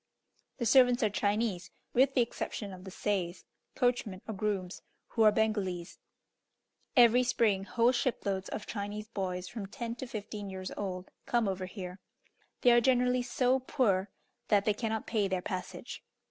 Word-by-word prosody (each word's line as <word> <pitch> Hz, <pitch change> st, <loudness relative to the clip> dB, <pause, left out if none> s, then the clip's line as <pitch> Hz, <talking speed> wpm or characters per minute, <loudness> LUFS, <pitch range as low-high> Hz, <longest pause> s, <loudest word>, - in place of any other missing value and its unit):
The 240 Hz, -, -2 dB
servants 245 Hz, 0 st, +5 dB
are 215 Hz, -, +2 dB
Chinese, 205 Hz, -3 st, 0 dB, 0.2 s
with 270 Hz, +2 st, +4 dB
the 250 Hz, -, +5 dB
exception 210 Hz, -3 st, -5 dB
of 185 Hz, 0 st, -11 dB
the -, -, -6 dB
seis 185 Hz, -2 st, -2 dB, 0.3 s
(coachmen 245 Hz, -7 st, 0 dB
or 220 Hz, -, -3 dB
grooms), 195 Hz, -3 st, -2 dB, 0.3 s
who 225 Hz, -, -1 dB
are 215 Hz, -1 st, +8 dB
Bengalese. 205 Hz, -5 st, -1 dB, 1.0 s
Every 240 Hz, 0 st, +7 dB
spring, 220 Hz, -6 st, +2 dB
whole 235 Hz, +3 st, +3 dB
shiploads 200 Hz, -6 st, -1 dB
of 210 Hz, -, -5 dB
Chinese 210 Hz, 0 st, -5 dB
boys, 185 Hz, -4 st, -3 dB
from 200 Hz, +1 st, -6 dB
ten 230 Hz, +3 st, -5 dB
to 260 Hz, -, -6 dB
fifteen 205 Hz, -2 st, -6 dB
years 185 Hz, -1 st, -6 dB
old, 185 Hz, -2 st, -5 dB, 0.2 s
come 235 Hz, -3 st, +2 dB
over 190 Hz, -1 st, -2 dB
here. 185 Hz, -1 st, -7 dB, 0.6 s
They 245 Hz, -, +6 dB
are 240 Hz, 0 st, +6 dB
generally 250 Hz, 0 st, +3 dB
so 250 Hz, +1 st, +2 dB
poor 210 Hz, -7 st, +1 dB, 0.4 s
that 205 Hz, -2 st, +3 dB
they 210 Hz, -, +3 dB
cannot 220 Hz, 0 st, -2 dB
pay 210 Hz, -3 st, +1 dB
their 185 Hz, -2 st, -2 dB
passage. 185 Hz, -2 st, -5 dB
210 Hz, 160 wpm, -31 LUFS, 190-240 Hz, 1.0 s, are